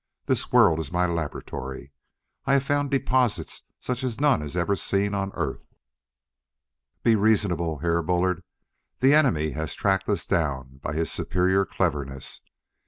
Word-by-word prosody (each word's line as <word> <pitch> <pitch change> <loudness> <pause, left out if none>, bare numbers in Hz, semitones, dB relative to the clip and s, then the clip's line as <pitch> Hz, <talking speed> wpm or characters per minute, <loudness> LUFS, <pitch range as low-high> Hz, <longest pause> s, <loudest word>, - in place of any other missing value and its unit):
This - - 0
world 80 - +5
is 80 -2 -4
my 90 0 +2
laboratory; 75 -5 -5 0.5
I 135 - +2
have 135 -1 +3
found 145 0 0
deposits 130 -4 0 0.2
such 125 0 -3
as 125 -3 -3
none 145 - +3
has 75 +3 -5
ever 95 +4 +1
seen 100 +1 0
on 95 -1 -2
Earth. - - -3 1.4
"Be 115 -2 +5
reasonable, 100 -7 +1
Herr 85 +2 +1
Bullard. 90 +2 0 0.6
The 135 +2 +6
enemy 90 - +3
has 80 -2 -4
tracked 95 -1 0
us - - 0
down 65 -5 -2
by 75 - -3
his 80 +1 -1
superior 95 +3 +1
cleverness. 70 -7 -3
90 Hz, 145 wpm, -25 LUFS, 80-110 Hz, 1.4 s, The